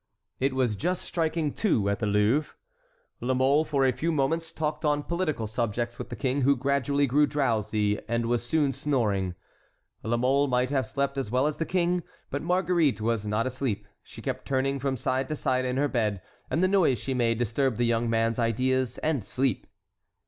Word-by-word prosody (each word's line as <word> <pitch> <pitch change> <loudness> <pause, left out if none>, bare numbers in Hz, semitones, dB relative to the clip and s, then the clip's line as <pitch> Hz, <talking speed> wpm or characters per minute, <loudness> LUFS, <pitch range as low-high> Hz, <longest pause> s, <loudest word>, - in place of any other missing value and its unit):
It 135 0 0
was 125 -5 +1
just 180 - -2
striking 160 -3 -1
two 120 - +1
at 100 -1 0
the 105 - -1
Louvre. 105 +9 +1 0.6
La 130 +1 0
Mole 135 +4 +3
for 140 -3 +1
a 130 - +4
few 165 +6 -1
moments 160 +3 0
talked 155 -1 -3
on 145 -1 +1
political 170 -9 -1
subjects 120 +2 -2
with - - -6
the 120 - -5
king, 135 +1 -1
who 140 +2 +4
gradually 140 +2 +1
grew 145 +3 +3
drowsy 110 -7 0
and 115 0 0
was 120 0 0
soon 140 +2 +1
snoring. 110 -10 0 0.7
La 120 +1 0
Mole 135 +4 +2
might 125 0 +1
have 135 -2 0
slept 140 0 -1
as 130 - -3
well 130 +4 +2
as 150 0 -1
the 165 - -2
king, 180 -1 +1 0.3
but 140 - -2
Marguerite 175 -5 +2
was 110 -1 -1
not 105 +2 0
asleep; 130 -4 -2
she - - -12
kept - - -4
turning 135 +1 0
from 135 0 -1
side 130 +3 -1
to 155 - -1
side 130 -3 0
in 125 0 -1
her 145 +1 +2
bed, 110 -7 0 0.3
and 170 - +1
the - - +5
noise 185 -10 +3
she 135 +5 -3
made 115 -3 +1
disturbed 120 +1 0
the 120 - +2
young 115 0 +1
man's 115 +1 +1
ideas 125 +2 +1
and 150 -7 0
sleep. 130 +1 -1
130 Hz, 195 wpm, -27 LUFS, 115-145 Hz, 0.7 s, the